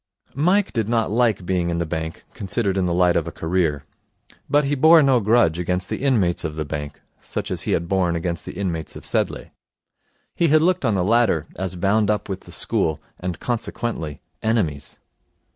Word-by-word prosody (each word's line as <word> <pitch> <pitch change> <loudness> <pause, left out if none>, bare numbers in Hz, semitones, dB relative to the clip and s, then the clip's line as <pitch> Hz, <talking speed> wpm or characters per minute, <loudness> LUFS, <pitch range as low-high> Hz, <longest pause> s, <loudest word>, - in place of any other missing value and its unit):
Mike 185 +8 +2
did 110 -3 -1
not 115 -3 +1
like 110 -5 +1
being 90 -1 0
in 85 - -1
the 85 - -1
bank, 80 0 -5
considered 100 0 -1
in 95 -2 +1
the - - 0
light 90 -1 +3
of - - 0
a - - -4
career. 80 -4 -1 0.6
But 145 +1 +4
he 140 - 0
bore 160 +3 +6
no 135 -3 +4
grudge 105 -6 +3
against 90 +2 -2
the - - -3
inmates 110 -11 +1
of 80 -2 -4
the 75 0 -3
bank, 75 -1 -6 0.2
such - - -5
as - - -2
he - - +2
had 85 - -1
borne 90 -2 +1
against 85 0 -3
the - - -7
inmates 85 -4 -3
of - - -8
Sedleigh. - - -1 0.8
He 170 - +2
had 155 +1 +4
looked 180 -3 +2
on 110 -4 +2
the 90 - +1
latter 110 -6 +2
as 95 -1 -4
bound 100 +4 +2
up 105 0 -1
with 95 -1 -3
the - - -15
school, 80 -1 0 0.2
and, 90 -1 -4
consequently, 115 - -3 0.2
enemies. 85 -11 -1
95 Hz, 195 wpm, -22 LUFS, 85-120 Hz, 0.8 s, bore